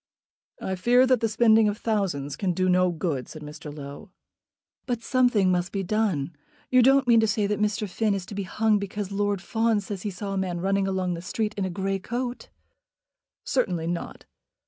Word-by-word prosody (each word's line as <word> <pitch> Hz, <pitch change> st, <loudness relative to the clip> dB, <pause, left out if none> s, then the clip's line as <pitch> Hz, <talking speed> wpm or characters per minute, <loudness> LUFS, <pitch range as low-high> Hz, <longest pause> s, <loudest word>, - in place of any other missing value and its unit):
"I 190 Hz, -, -3 dB
fear 240 Hz, +7 st, +4 dB
that 255 Hz, -2 st, +3 dB
the 225 Hz, -, 0 dB
spending 220 Hz, -1 st, +4 dB
of 205 Hz, -, -3 dB
thousands 185 Hz, -12 st, -1 dB
can 185 Hz, 0 st, -1 dB
do 185 Hz, +2 st, 0 dB
no 180 Hz, 0 st, +4 dB
good," 160 Hz, -6 st, -2 dB
said 155 Hz, -2 st, -9 dB
Mr. 150 Hz, 0 st, -8 dB
Low. 145 Hz, +7 st, -9 dB, 0.8 s
"But 240 Hz, -2 st, -2 dB
something 245 Hz, -8 st, +3 dB
must 180 Hz, 0 st, 0 dB
be 195 Hz, -1 st, -2 dB
done. 180 Hz, -7 st, -1 dB, 0.4 s
You 255 Hz, 0 st, +6 dB
don't 270 Hz, +2 st, +5 dB
mean 235 Hz, -1 st, +6 dB
to 220 Hz, -, +3 dB
say 210 Hz, 0 st, +1 dB
that 210 Hz, +1 st, -1 dB
Mr. 210 Hz, 0 st, 0 dB
Finn 205 Hz, +2 st, 0 dB
is 190 Hz, -2 st, -4 dB
to -, -, -9 dB
be 200 Hz, -, -3 dB
hung 215 Hz, +2 st, +1 dB
because 200 Hz, 0 st, -5 dB
Lord 200 Hz, -1 st, -1 dB
Fawn 225 Hz, +1 st, +1 dB
says 200 Hz, -1 st, -5 dB
that -, -, -11 dB
he -, -, 0 dB
saw 195 Hz, +1 st, -5 dB
a 195 Hz, -, -1 dB
man 180 Hz, -2 st, -2 dB
running 195 Hz, +2 st, +1 dB
along 185 Hz, -2 st, -1 dB
the 170 Hz, -, -5 dB
street 210 Hz, +4 st, -2 dB
in 200 Hz, -2 st, -2 dB
a -, -, -2 dB
grey 195 Hz, +2 st, -2 dB
coat." 245 Hz, +5 st, -4 dB, 0.9 s
"Certainly 180 Hz, -11 st, 0 dB
not." 170 Hz, +1 st, -5 dB
200 Hz, 205 wpm, -26 LUFS, 180-220 Hz, 0.9 s, You